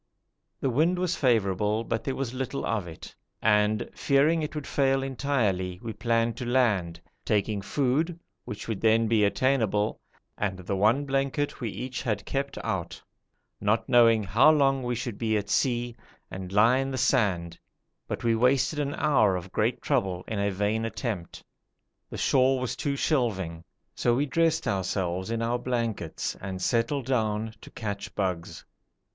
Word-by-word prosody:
The 135 Hz, -, 0 dB
wind 160 Hz, +8 st, +2 dB
was 180 Hz, -1 st, 0 dB
favourable, 105 Hz, -3 st, +1 dB
but 115 Hz, 0 st, -2 dB
there 135 Hz, -, -2 dB
was 130 Hz, -3 st, -3 dB
little 130 Hz, +1 st, -3 dB
of 105 Hz, -6 st, -1 dB
it, 80 Hz, -, -10 dB, 0.3 s
and 105 Hz, +1 st, +2 dB
fearing 150 Hz, +4 st, +2 dB
it 150 Hz, 0 st, -4 dB
would 150 Hz, -2 st, -4 dB
fail 135 Hz, -1 st, +1 dB
entirely 115 Hz, -10 st, -1 dB
we 115 Hz, -1 st, -4 dB
planned 115 Hz, +1 st, 0 dB
to 125 Hz, -, -4 dB
land, 105 Hz, -10 st, +1 dB, 0.2 s
taking 105 Hz, -1 st, 0 dB
food, 145 Hz, -, 0 dB, 0.2 s
which 105 Hz, -, -7 dB
would 110 Hz, -4 st, -3 dB
then 115 Hz, 0 st, +4 dB
be 110 Hz, -1 st, +3 dB
attainable, 110 Hz, -2 st, +1 dB, 0.4 s
and 100 Hz, -3 st, -1 dB
the 95 Hz, +2 st, -3 dB
one 110 Hz, +9 st, +3 dB
blanket 140 Hz, +1 st, -1 dB
we 115 Hz, -, -2 dB
each 130 Hz, +5 st, -5 dB
had 105 Hz, -3 st, -2 dB
kept 140 Hz, 0 st, -3 dB
out, 85 Hz, -3 st, -3 dB, 0.6 s
not 105 Hz, +2 st, +1 dB
knowing 115 Hz, -3 st, +5 dB
how 110 Hz, -, +5 dB
long 135 Hz, -3 st, +3 dB
we 120 Hz, -1 st, -2 dB
should 120 Hz, -3 st, -5 dB
be 110 Hz, -2 st, +1 dB
at 105 Hz, 0 st, -4 dB
sea, 120 Hz, -2 st, +1 dB, 0.4 s
and 95 Hz, 0 st, -6 dB
lie 115 Hz, +5 st, +5 dB
in 135 Hz, 0 st, -1 dB
the 130 Hz, -, -3 dB
sand, 90 Hz, -11 st, +1 dB, 0.5 s
but -, -, -4 dB
we 115 Hz, -1 st, +3 dB
wasted 130 Hz, +5 st, +2 dB
an 145 Hz, 0 st, -1 dB
hour 110 Hz, -10 st, +3 dB
of 90 Hz, +1 st, -6 dB
great 115 Hz, +3 st, 0 dB
trouble 95 Hz, -11 st, 0 dB
in 110 Hz, -3 st, -3 dB
a 100 Hz, 0 st, +1 dB
vain 105 Hz, +3 st, -1 dB
attempt. 110 Hz, -5 st, -4 dB, 0.7 s
The -, -, -7 dB
shore 130 Hz, 0 st, +3 dB
was 125 Hz, -1 st, -2 dB
too 140 Hz, -2 st, -2 dB
shelving, 100 Hz, -, -1 dB, 0.3 s
so 120 Hz, -, +1 dB
we 140 Hz, +4 st, +1 dB
dressed 160 Hz, +3 st, +1 dB
ourselves 95 Hz, -1 st, -1 dB
in 115 Hz, 0 st, -1 dB
our 120 Hz, +1 st, 0 dB
blankets 115 Hz, -9 st, -2 dB
and 95 Hz, -1 st, -5 dB
settled 115 Hz, +7 st, 0 dB
down 110 Hz, -3 st, -1 dB
to -, -, -12 dB
catch 100 Hz, -2 st, -6 dB
bugs. 90 Hz, -4 st, -3 dB
115 Hz, 165 wpm, -27 LUFS, 100-135 Hz, 0.7 s, knowing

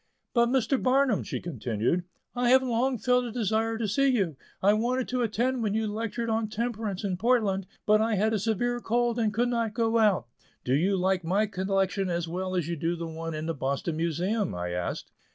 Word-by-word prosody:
But, 235 Hz, -1 st, +4 dB
Mr. 260 Hz, +1 st, +1 dB
Barnum," 260 Hz, -3 st, +3 dB
she, -, -, -4 dB
continued, 130 Hz, -, -1 dB, 0.3 s
"I 245 Hz, -1 st, +1 dB
have 260 Hz, +1 st, +6 dB
long 250 Hz, +1 st, +1 dB
felt 250 Hz, +1 st, +2 dB
a 235 Hz, -, -5 dB
desire 225 Hz, 0 st, 0 dB
to 225 Hz, -1 st, -1 dB
see 275 Hz, +8 st, +2 dB
you; 200 Hz, -, +1 dB, 0.2 s
I 200 Hz, +2 st, +4 dB
wanted 245 Hz, +4 st, 0 dB
to 250 Hz, 0 st, 0 dB
attend 240 Hz, +3 st, 0 dB
when 210 Hz, -2 st, 0 dB
you 220 Hz, 0 st, +1 dB
lectured 225 Hz, +2 st, -3 dB
on 220 Hz, -1 st, 0 dB
temperance 220 Hz, -3 st, -3 dB
in 190 Hz, -3 st, -1 dB
Portland, 205 Hz, -4 st, +1 dB, 0.2 s
but 215 Hz, +1 st, +4 dB
I 220 Hz, 0 st, +1 dB
had 215 Hz, +3 st, +1 dB
a 215 Hz, -, +1 dB
severe 235 Hz, +4 st, 0 dB
cold 240 Hz, 0 st, 0 dB
and 220 Hz, -2 st, +2 dB
could 240 Hz, +3 st, +1 dB
not 230 Hz, -3 st, -1 dB
go 230 Hz, -1 st, +2 dB
out." 205 Hz, -, +3 dB, 0.4 s
"Do 125 Hz, -, 0 dB
you 185 Hz, +8 st, +2 dB
like 185 Hz, 0 st, +1 dB
my 195 Hz, +6 st, +2 dB
collection 195 Hz, -1 st, -1 dB
as 170 Hz, -1 st, -1 dB
well 185 Hz, +2 st, -3 dB
as 175 Hz, -4 st, 0 dB
you 170 Hz, -, -2 dB
do 165 Hz, +2 st, -1 dB
the 170 Hz, 0 st, -5 dB
one 165 Hz, 0 st, -5 dB
in 155 Hz, +1 st, -4 dB
the 165 Hz, -, -1 dB
Boston 140 Hz, +3 st, -2 dB
Museum?" 175 Hz, -, -1 dB
I 90 Hz, 0 st, -3 dB
asked. 90 Hz, 0 st, -4 dB
215 Hz, 210 wpm, -28 LUFS, 180-235 Hz, 0.4 s, have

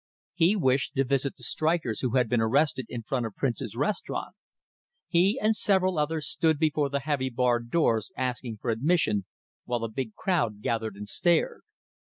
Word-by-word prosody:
He 175 Hz, +4 st, +3 dB
wished 135 Hz, -5 st, +1 dB
to 135 Hz, -, +3 dB
visit 135 Hz, +1 st, 0 dB
the 125 Hz, -, -14 dB
strikers 155 Hz, -2 st, 0 dB
who 125 Hz, -1 st, -1 dB
had 125 Hz, -2 st, +3 dB
been 115 Hz, 0 st, +1 dB
arrested 130 Hz, +2 st, +1 dB
in 120 Hz, -2 st, -5 dB
front 120 Hz, +1 st, -1 dB
of 105 Hz, -, -11 dB
Prince's 115 Hz, -5 st, -2 dB
restaurant. 150 Hz, +10 st, -2 dB, 0.7 s
He 190 Hz, +6 st, +3 dB
and 215 Hz, +1 st, +2 dB
several 185 Hz, -5 st, +2 dB
others 155 Hz, +1 st, -1 dB
stood 160 Hz, -2 st, +1 dB
before 150 Hz, -2 st, +1 dB
the 140 Hz, 0 st, -1 dB
heavy 140 Hz, -2 st, -1 dB
barred 120 Hz, -1 st, 0 dB
doors 115 Hz, -8 st, +1 dB
asking 125 Hz, -3 st, -3 dB
for 120 Hz, -, 0 dB
admission, 115 Hz, -, +1 dB, 0.4 s
while 120 Hz, -2 st, -2 dB
a 115 Hz, -, -2 dB
big 110 Hz, -1 st, -5 dB
crowd 120 Hz, -, -1 dB
gathered 110 Hz, -3 st, -1 dB
and 105 Hz, +1 st, -8 dB
stared. 170 Hz, -, +1 dB
130 Hz, 175 wpm, -27 LUFS, 115-160 Hz, 0.7 s, He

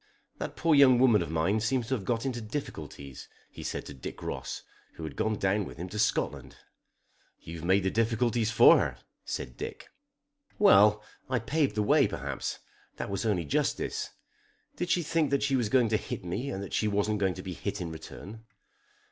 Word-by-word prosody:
"That -, -, -4 dB
poor 165 Hz, -1 st, +2 dB
young 135 Hz, -3 st, +7 dB
woman 120 Hz, -4 st, +5 dB
of -, -, -3 dB
mine 80 Hz, +7 st, +1 dB
seems 120 Hz, +2 st, 0 dB
to -, -, +1 dB
have 105 Hz, -7 st, -2 dB
got 115 Hz, +3 st, -1 dB
into 125 Hz, -3 st, -2 dB
difficulties," 105 Hz, -, -7 dB, 0.2 s
he -, -, -10 dB
said -, -, -4 dB
to -, -, -8 dB
Dick 65 Hz, -, -8 dB
Ross, -, -, -5 dB, 0.3 s
who 80 Hz, -, -9 dB
had 80 Hz, -, -6 dB
gone 110 Hz, 0 st, 0 dB
down 100 Hz, +1 st, +1 dB
with -, -, -9 dB
him 90 Hz, +3 st, -6 dB
to 105 Hz, -, -5 dB
Scotland. 110 Hz, -, -1 dB, 0.8 s
"You 85 Hz, +1 st, -8 dB
have 80 Hz, -, -7 dB
made 95 Hz, +2 st, +3 dB
the 95 Hz, -, +1 dB
difficulties 115 Hz, 0 st, +1 dB
for 110 Hz, -, +7 dB
her," -, -, -2 dB, 0.3 s
said -, -, -5 dB
Dick. -, -, -7 dB, 0.7 s
"Well; 105 Hz, -, +6 dB, 0.3 s
I 130 Hz, -, +1 dB
paved 135 Hz, +1 st, 0 dB
the 105 Hz, -, +1 dB
way 145 Hz, +5 st, +4 dB
perhaps. 70 Hz, -4 st, -4 dB, 0.4 s
That -, -, -5 dB
was 100 Hz, +3 st, -1 dB
only 90 Hz, -6 st, 0 dB
justice. 70 Hz, -, -1 dB, 0.7 s
Did 175 Hz, 0 st, -3 dB
she 175 Hz, 0 st, +2 dB
think 160 Hz, -1 st, +1 dB
that 140 Hz, -1 st, +1 dB
she 140 Hz, -1 st, +2 dB
was 120 Hz, -5 st, +1 dB
going 125 Hz, -2 st, +3 dB
to 110 Hz, -, +2 dB
hit 95 Hz, -, -6 dB
me 110 Hz, +11 st, -3 dB
and 100 Hz, -6 st, -4 dB
that 100 Hz, -, -8 dB
she 110 Hz, -, +1 dB
wasn't 105 Hz, +1 st, 0 dB, 0.2 s
to 95 Hz, -, -8 dB
be 95 Hz, -, -5 dB
hit 100 Hz, +3 st, -4 dB
in 85 Hz, -3 st, -4 dB
return?" 100 Hz, +7 st, -10 dB
105 Hz, 200 wpm, -29 LUFS, 95-125 Hz, 0.8 s, young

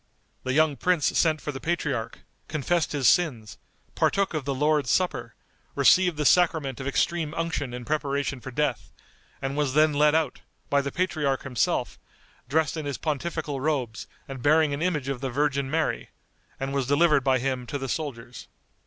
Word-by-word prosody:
The 130 Hz, -, -2 dB
young 155 Hz, -1 st, +3 dB
prince 180 Hz, +2 st, +1 dB
sent 155 Hz, -2 st, +2 dB
for 150 Hz, -, -3 dB
the 135 Hz, -, -7 dB
patriarch, 150 Hz, -7 st, -2 dB, 0.3 s
confessed 160 Hz, +2 st, 0 dB
his 140 Hz, -4 st, +1 dB
sins, 125 Hz, -12 st, +1 dB, 0.3 s
partook 200 Hz, -2 st, +1 dB
of 155 Hz, -4 st, -3 dB
the 140 Hz, -1 st, -1 dB
Lord's 150 Hz, -1 st, +1 dB
Supper, 180 Hz, +9 st, 0 dB, 0.4 s
received 180 Hz, -4 st, +4 dB
the 150 Hz, -, -1 dB
sacrament 160 Hz, -6 st, +3 dB
of 135 Hz, -, -4 dB
extreme 160 Hz, +2 st, 0 dB
unction 165 Hz, -6 st, -2 dB
in 125 Hz, 0 st, -7 dB
preparation 140 Hz, -2 st, -1 dB
for 130 Hz, -, -7 dB
death, 125 Hz, -, -2 dB, 0.5 s
and 135 Hz, +1 st, -2 dB
was 145 Hz, -2 st, 0 dB
then 155 Hz, 0 st, +5 dB
led 150 Hz, +1 st, +4 dB
out, 160 Hz, -4 st, 0 dB, 0.3 s
by 140 Hz, 0 st, +4 dB
the 140 Hz, 0 st, -4 dB
patriarch 155 Hz, -7 st, -1 dB
himself, 125 Hz, -6 st, -1 dB, 0.5 s
dressed 155 Hz, +2 st, +1 dB
in 155 Hz, -2 st, -4 dB
his 140 Hz, -, -3 dB
pontifical 155 Hz, -2 st, -3 dB
robes 130 Hz, -7 st, -2 dB, 0.2 s
and 135 Hz, -2 st, -7 dB
bearing 155 Hz, +1 st, +3 dB
an 140 Hz, -, -3 dB
image 160 Hz, -6 st, -1 dB
of 135 Hz, -2 st, -3 dB
the 135 Hz, -, -2 dB
Virgin 140 Hz, 0 st, 0 dB
Mary, 160 Hz, +2 st, -1 dB, 0.5 s
and 135 Hz, 0 st, -3 dB
was 135 Hz, -3 st, -1 dB
delivered 145 Hz, 0 st, +4 dB
by 130 Hz, -1 st, +3 dB
him 130 Hz, -1 st, -2 dB
to 145 Hz, -, -3 dB
the 135 Hz, -1 st, -5 dB
soldiers. 125 Hz, -5 st, -5 dB
145 Hz, 175 wpm, -26 LUFS, 135-155 Hz, 0.5 s, then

